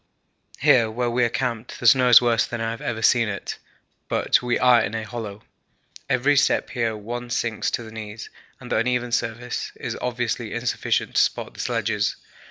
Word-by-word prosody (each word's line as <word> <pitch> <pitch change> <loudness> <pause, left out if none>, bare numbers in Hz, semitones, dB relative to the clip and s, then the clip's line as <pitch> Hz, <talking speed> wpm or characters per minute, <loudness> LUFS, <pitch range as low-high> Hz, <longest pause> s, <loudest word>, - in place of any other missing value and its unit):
Here 115 -3 +4
where 120 +2 -2
we 125 +1 +2
are - - 0
camped 120 -1 -3
the - - -6
snow 125 +1 +6
is 120 - +10
worse 115 -1 +2
than 120 - -5
I 115 0 -1
have 115 - -7
ever 110 -1 -3
seen 115 0 +4
it, 100 - -5 0.5
but - - +2
we 125 -1 0
are 125 -2 +5
in 110 0 -3
a 110 - -3
hollow. 110 -2 -7 0.7
Every 140 +2 +3
step 145 - +2
here 115 -3 -1
one 120 +3 -6
sinks 115 -1 -1
to 120 - -3
the 110 - -11
knees 110 0 -8 0.3
and - - -11
the - - +2
uneven 120 +1 0
surface 120 +1 -2
is - - -5
obviously 120 -2 -2
insufficient 120 +1 -1
to - - +4
support - - -1
the - - -15
sledges. - - -1
120 Hz, 190 wpm, -23 LUFS, 110-125 Hz, 0.7 s, is